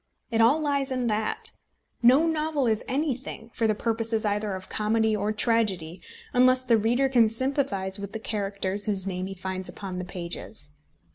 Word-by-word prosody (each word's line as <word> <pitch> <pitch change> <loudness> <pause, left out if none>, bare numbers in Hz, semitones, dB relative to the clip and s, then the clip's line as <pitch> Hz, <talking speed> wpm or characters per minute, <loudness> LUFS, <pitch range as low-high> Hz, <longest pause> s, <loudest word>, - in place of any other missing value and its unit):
It 225 0 +2
all 250 +7 +5
lies 285 -2 0
in 255 -2 -1
that. 215 +1 -2 0.5
No 255 +7 +6
novel 310 -3 0
is 220 -2 +1
anything, 260 -4 -3
for 225 - +1
the 215 - +1
purposes 225 0 0
either 205 -1 -1
of 185 0 -8
comedy 220 +1 +1
or 210 +1 -1
tragedy, 205 -7 0 0.3
unless 255 +1 +5
the 240 -2 +4
reader 240 +5 +2
can 240 -4 +4
sympathise 225 -6 0
with 200 0 -6
the 220 - -4
characters 200 -2 -1
whose 195 -3 +1
names 185 0 -3
he 195 - -6
finds 185 0 -4
upon 185 -2 -6
the - - -3
pages. 170 -2 -5
220 Hz, 170 wpm, -26 LUFS, 195-255 Hz, 0.5 s, No